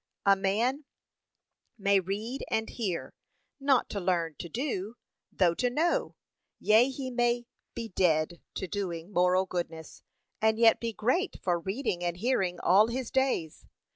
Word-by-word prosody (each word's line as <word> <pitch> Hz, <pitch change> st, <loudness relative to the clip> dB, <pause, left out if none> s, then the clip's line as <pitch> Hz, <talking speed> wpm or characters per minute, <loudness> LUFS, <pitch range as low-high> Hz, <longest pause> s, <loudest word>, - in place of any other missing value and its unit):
A 200 Hz, 0 st, +6 dB
man 225 Hz, +9 st, 0 dB, 0.9 s
may 200 Hz, -1 st, +3 dB
read 210 Hz, +8 st, -4 dB
and 220 Hz, 0 st, 0 dB
hear, 195 Hz, -8 st, -3 dB, 0.5 s
not 275 Hz, -2 st, +3 dB
to 205 Hz, -, -2 dB
learn 175 Hz, -3 st, 0 dB
to 170 Hz, -, -6 dB
do, 230 Hz, -, -3 dB, 0.4 s
though 175 Hz, -3 st, +3 dB
to 245 Hz, +8 st, 0 dB
know; 340 Hz, -, 0 dB, 0.4 s
yea 225 Hz, +5 st, +5 dB
he 265 Hz, -1 st, -5 dB
may 240 Hz, 0 st, +1 dB, 0.3 s
be 230 Hz, -1 st, -5 dB
dead 170 Hz, -2 st, +1 dB
to 190 Hz, -, -3 dB
doing 180 Hz, -2 st, -4 dB
moral 180 Hz, +1 st, +3 dB
goodness, 170 Hz, -3 st, -5 dB, 0.4 s
and 220 Hz, 0 st, +3 dB
yet 230 Hz, -1 st, +5 dB
be 230 Hz, -1 st, -2 dB
great 255 Hz, -, 0 dB
for 175 Hz, -2 st, +1 dB
reading 195 Hz, 0 st, -2 dB
and 175 Hz, 0 st, -2 dB
hearing 190 Hz, -5 st, 0 dB
all 200 Hz, +5 st, +5 dB
his 245 Hz, +1 st, -4 dB
days. 265 Hz, -, -1 dB
205 Hz, 145 wpm, -29 LUFS, 180-245 Hz, 0.9 s, A